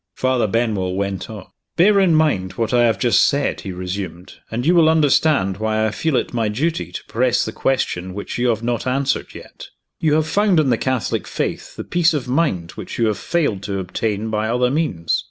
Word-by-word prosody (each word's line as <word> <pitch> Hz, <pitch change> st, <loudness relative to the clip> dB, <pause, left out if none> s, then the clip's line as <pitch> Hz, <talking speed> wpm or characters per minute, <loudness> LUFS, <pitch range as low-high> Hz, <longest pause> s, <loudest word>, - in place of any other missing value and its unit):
Father 130 Hz, -3 st, +1 dB
Benwell 105 Hz, -4 st, -1 dB
went 100 Hz, -1 st, -3 dB
on. 105 Hz, -4 st, -8 dB, 0.3 s
"Bear 200 Hz, +4 st, +5 dB
in 180 Hz, -4 st, +4 dB
mind 140 Hz, -13 st, +1 dB
what 115 Hz, 0 st, -2 dB
I 120 Hz, -1 st, +4 dB
have 115 Hz, -4 st, +2 dB
just 120 Hz, +4 st, +3 dB
said," 140 Hz, 0 st, 0 dB
he 95 Hz, -, -6 dB
resumed; 90 Hz, -1 st, -6 dB, 0.2 s
"and 120 Hz, +3 st, -3 dB
you 170 Hz, -, +4 dB
will 165 Hz, -3 st, +5 dB
understand 145 Hz, -10 st, +3 dB
why 110 Hz, 0 st, 0 dB
I 110 Hz, -, 0 dB
feel 160 Hz, +5 st, -1 dB
it -, -, -1 dB
my 115 Hz, -3 st, 0 dB
duty 155 Hz, +10 st, -2 dB
to -, -, -7 dB
press 120 Hz, +1 st, +1 dB
the 110 Hz, -, -4 dB
question 95 Hz, -9 st, -1 dB
which 100 Hz, +3 st, -5 dB
you 125 Hz, -, +2 dB
have 115 Hz, -1 st, 0 dB
not 120 Hz, +1 st, -2 dB
answered 135 Hz, +1 st, -1 dB
yet. -, -, -11 dB, 0.3 s
You 155 Hz, -2 st, +2 dB
have 155 Hz, 0 st, +2 dB
found 195 Hz, +1 st, +2 dB
in 140 Hz, -4 st, +2 dB
the 115 Hz, -, +3 dB
Catholic 130 Hz, -3 st, -1 dB
Faith -, -, -4 dB
the -, -, -5 dB
peace 175 Hz, -2 st, +2 dB
of 135 Hz, -4 st, -3 dB
mind 125 Hz, -, 0 dB
which -, -, -8 dB
you 115 Hz, -, +2 dB
have 110 Hz, -2 st, 0 dB
failed 145 Hz, -, 0 dB
to 100 Hz, -1 st, -3 dB
obtain 105 Hz, +3 st, -2 dB
by 110 Hz, 0 st, -1 dB
other 125 Hz, +1 st, +1 dB
means. 135 Hz, -, 0 dB
120 Hz, 210 wpm, -20 LUFS, 100-150 Hz, 0.3 s, Bear